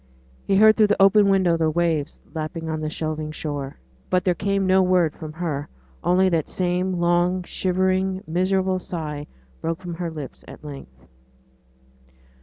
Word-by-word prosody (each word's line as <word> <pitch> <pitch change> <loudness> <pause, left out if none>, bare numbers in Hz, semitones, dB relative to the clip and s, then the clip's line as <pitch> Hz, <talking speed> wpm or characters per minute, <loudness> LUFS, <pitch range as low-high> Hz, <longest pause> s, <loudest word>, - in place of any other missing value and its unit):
He 195 - +3
heard 215 +2 +6
through 215 -2 +5
the 205 - +1
open 200 +1 +6
window 185 -4 +3
the 160 -1 +2
waves 160 -2 -1
lapping 160 +1 -4
on 155 -1 -3
the 155 - -2
shelving 155 -1 -3
shore. 145 -3 -5 0.3
But 185 +1 +1
there 180 - +3
came 195 +2 0
no 190 0 +4
word 180 -4 +3
from 155 -1 -8
her; 155 -4 -3 0.3
only 180 +2 +3
that 165 -4 0
same 180 +1 0
long 175 +1 +2
shivering, 185 +1 0
miserable 185 +3 +1
sigh 150 -5 -5 0.3
broke 165 +1 -2
from 180 -2 -6
her 170 0 -3
lips 150 -4 -8
at - - -12
length. 100 - -11
175 Hz, 160 wpm, -23 LUFS, 155-185 Hz, 0.3 s, heard